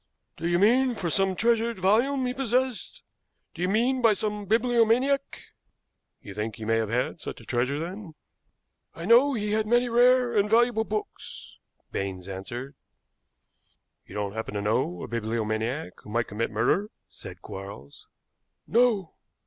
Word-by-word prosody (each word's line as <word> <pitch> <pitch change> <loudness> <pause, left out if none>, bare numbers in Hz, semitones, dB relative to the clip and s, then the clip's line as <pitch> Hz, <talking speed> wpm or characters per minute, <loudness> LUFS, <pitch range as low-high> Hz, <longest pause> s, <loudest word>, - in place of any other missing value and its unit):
"Do 170 - -3
you 175 0 +2
mean 245 +6 +4
for 175 -6 -2
some 190 +2 +2
treasured 230 +2 +1
volume 240 +8 +2
he 250 - -1
possessed? 255 -1 -1 0.5
Do 170 - -8
you 180 - +1
mean 245 +5 +2
by 225 -3 +5
some 210 0 -3
bibliomaniac?" 240 +4 +2 0.8
"You 100 - -9
think 105 +2 -4
he 110 -3 -8
may 115 +1 +2
have 110 -2 -1
had 125 +3 -1
such - - -6
a - - -14
treasure, 130 +3 0
then?" 175 0 -7 0.8
"I 165 - -6
know 250 +6 +5
he 210 -2 -2
had 215 0 +1
many 240 +2 +3
rare 245 0 +4
and 205 0 +3
valuable 230 0 +3
books," 215 -1 -6 0.3
Baines 95 -2 -4
answered. 120 +8 -6 1.3
"You - - -11
don't 100 -1 -2
happen 110 -1 -5
to 100 - -1
know 90 -4 0
a - - -5
bibliomaniac 115 +4 -2
who - - -13
might 115 +2 0
commit 110 +3 -3
murder?" 120 - +1 0.2
said - - -12
Quarles. 95 -8 -10 0.6
"No." 225 -7 +2
195 Hz, 155 wpm, -26 LUFS, -, 1.3 s, by